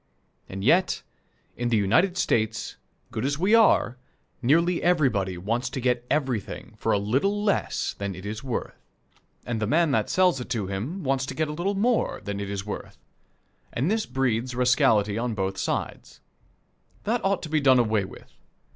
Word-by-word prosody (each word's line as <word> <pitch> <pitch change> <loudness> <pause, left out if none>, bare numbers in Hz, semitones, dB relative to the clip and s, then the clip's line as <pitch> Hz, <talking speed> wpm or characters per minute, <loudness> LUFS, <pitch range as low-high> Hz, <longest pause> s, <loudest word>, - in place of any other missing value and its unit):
And 95 0 -6
yet, 175 - +3 0.5
in 120 0 -2
the 115 - +3
United 160 - +2
States, 110 -6 0 0.4
good - - -3
as 140 +1 0
we 190 +7 +2
are, 205 - +4 0.4
nearly 170 +7 +3
everybody 125 - +1
wants 115 +8 -2
to 135 - -4
get 125 -1 0
everything 130 -9 -2
for - - 0
a - - +3
little 140 - 0
less 205 -2 0
than 100 -1 -3
it 95 +3 -10
is 110 +3 -5
worth, 125 -4 -3 0.7
and 115 -2 -3
the 110 - 0
man 160 +4 +3
that 110 -6 +1
sells 180 -7 +3
it 125 - -8
to 115 -6 -1
him 115 - -4
wants 135 -1 0
to - - -5
get 155 -1 -1
a - - -3
little 185 +6 -1
more 230 +4 +1
than 100 -1 -4
it 100 -1 -4
is 100 -1 -4
worth? 105 - -7 0.7
and 140 +10 0
this 220 -1 0
breeds 125 -2 -1
rascality 120 -5 +3
on 120 -1 -2
both 95 -1 -2
sides. - - -4 0.8
That 230 +2 0
ought 195 -1 +1
to 160 - -5
be 155 -1 +1
done 130 -2 +6
away 110 -4 +2
with. - - -13
125 Hz, 180 wpm, -26 LUFS, 105-165 Hz, 0.8 s, done